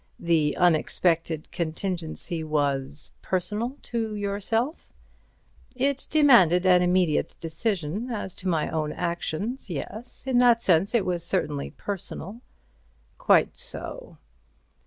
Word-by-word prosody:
The 155 -4 +1
unexpected 165 -1 +1
contingency 170 -1 -3
was—personal 155 - -2
to 225 -2 -3
yourself?" 210 - -2 0.9
"It 275 +2 0
demanded 230 - +5
an 180 -1 +6
immediate 180 -3 +1
decision 180 +4 -2
as 210 -6 -4
to 185 - -5
my 165 -4 +1
own 155 -2 -1
actions 180 - -3
yes, 215 - -6
in 260 -2 +2
that 240 -2 +6
sense 190 +2 +2
it 220 - +2
was 175 -2 -1
certainly 150 -6 -1
personal." 200 +2 -6 0.8
"Quite - - +4
so. - - -4
180 Hz, 105 wpm, -26 LUFS, 160-225 Hz, 0.9 s, an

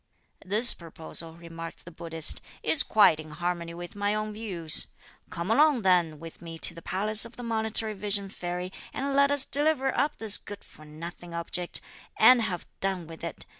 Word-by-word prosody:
"This 215 +5 +7
proposal," 165 0 -5
remarked 165 -1 -10
the 175 - -10
Buddhist, 165 -1 0 0.2
"is 320 - +5
quite 205 -7 +4
in 155 0 -9
harmony 170 +1 -4
with 175 +2 -9
my 205 +1 0
own 215 0 -3
views. 185 -8 +2 0.4
Come 185 +2 -4
along 285 -2 +4
then 175 -5 +2
with 165 0 -11
me 165 -1 -8
to 170 - +1
the 170 - -11
palace 210 +5 +2
of 230 0 -4
the 245 - -9
Monitory 220 -1 -2
Vision 200 0 -1
Fairy, 180 -1 -5 0.2
and 275 +1 -2
let 280 0 +4
us 285 -1 +2
deliver 285 -2 +1
up 290 +2 0
this 220 -2 +3
good 205 -1 -10
for 155 - -16
nothing 170 +3 -9
object, 170 +1 -3 0.4
and 250 -2 +7
have 180 -5 -3
done 190 -3 -2
with 165 +1 -12
it! 170 - -7
185 Hz, 180 wpm, -27 LUFS, 170-220 Hz, 0.4 s, This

